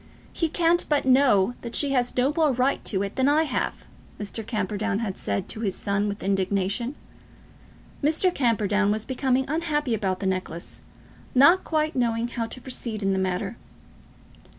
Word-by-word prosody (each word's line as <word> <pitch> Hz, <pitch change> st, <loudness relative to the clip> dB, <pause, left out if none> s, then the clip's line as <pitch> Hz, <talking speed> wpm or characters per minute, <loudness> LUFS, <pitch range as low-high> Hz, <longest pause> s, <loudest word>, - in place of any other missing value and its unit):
"He 330 Hz, -, 0 dB
can't 340 Hz, +1 st, +2 dB
but 295 Hz, -3 st, +2 dB
know 255 Hz, -6 st, +4 dB
that 235 Hz, -1 st, -5 dB
she 285 Hz, -2 st, +3 dB
has 250 Hz, -2 st, 0 dB
no 260 Hz, +4 st, +2 dB
more 315 Hz, -3 st, +3 dB
right 255 Hz, +2 st, 0 dB
to 195 Hz, -2 st, 0 dB
it 200 Hz, -, -6 dB
than 260 Hz, +1 st, +3 dB
I 305 Hz, +2 st, +4 dB
have," 315 Hz, -, -3 dB, 0.3 s
Mr. 210 Hz, +2 st, -4 dB
Camperdown 210 Hz, -1 st, -2 dB
had 210 Hz, -4 st, -3 dB
said 100 Hz, -1 st, -3 dB
to -, -, -4 dB
his 205 Hz, -4 st, -1 dB
son 200 Hz, 0 st, 0 dB
with 205 Hz, 0 st, -5 dB
indignation. 200 Hz, +6 st, 0 dB, 1.1 s
Mr. 320 Hz, +5 st, +3 dB
Camperdown 210 Hz, -, +1 dB
was 215 Hz, +1 st, -1 dB
becoming 260 Hz, 0 st, 0 dB
unhappy 295 Hz, -4 st, -1 dB
about 190 Hz, -4 st, -1 dB
the 200 Hz, -, -4 dB
necklace, 185 Hz, -3 st, -4 dB, 0.5 s
not 335 Hz, +9 st, +6 dB
quite 310 Hz, -1 st, -1 dB
knowing 235 Hz, -2 st, 0 dB
how 230 Hz, -1 st, -3 dB
to 255 Hz, -, -7 dB
proceed 235 Hz, -4 st, -4 dB
in 195 Hz, 0 st, +2 dB
the 190 Hz, -, 0 dB
matter. 190 Hz, +4 st, -2 dB
235 Hz, 170 wpm, -25 LUFS, 200-275 Hz, 1.1 s, not